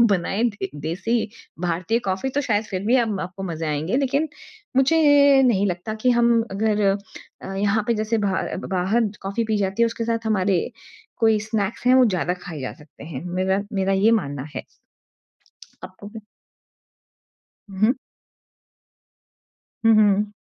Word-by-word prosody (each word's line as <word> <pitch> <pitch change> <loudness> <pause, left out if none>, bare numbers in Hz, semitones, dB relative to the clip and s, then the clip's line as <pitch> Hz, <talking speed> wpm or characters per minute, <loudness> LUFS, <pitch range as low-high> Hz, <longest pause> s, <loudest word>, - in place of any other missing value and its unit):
बनाएँ 195 +5 -2
भी। 200 -2 -6 0.2
देसी 220 +8 0 0.5
भारतीय 180 +7 0
कॉफ़ी 190 +8 -1
तो 280 +2 -1
शायद 210 0 +1
फिर 185 0 -2
भी 240 +4 +4
आपको 195 -3 -4
मज़े 160 0 -4
आएँगे। 155 - -1
लेकिन 280 +3 0 0.5
मुझे 270 +5 +4 0.5
नहीं 200 -4 +2
लगता 180 +4 -3
कि 250 - +5
हम 235 -1 +3
अगर 210 +1 0 0.6
अ, 195 - -6
यहाँ 205 +2 +1
पे 235 - +3
जैसे 215 +1 0
ब 205 - -1 0.5
बाहर 190 +5 +1
जैसी 210 -2 -2
कॉफ़ी 200 +4 -2
पी 220 -1 0
जाती 195 +2 -1
है। - - +5
उसके 230 0 -3
साथ 230 0 0
हमारे 195 -3 +2 0.6
कोई 220 -2 +3
स्नैक्स 215 +1 -3
हैं 255 - +6
वो 260 -1 +6
ज़्यादा 180 -4 0
खाए 165 -6 -7
जा 130 - -4
सकते 150 -2 -16
हैं। 155 -3 -7
मेरा 190 +1 +1
मेरा 195 0 +1
ये 200 +4 +4
मानना 145 -11 -1
है। - - -4 1.2
आपको 185 +2 -10
भी 220 +1 -10 1.5
हुँ। 200 +4 +2 1.9
हुँ, 225 - +7
हुँ। 205 -1 +3
205 Hz, 155 wpm, -23 LUFS, 190-230 Hz, 1.9 s, हुँ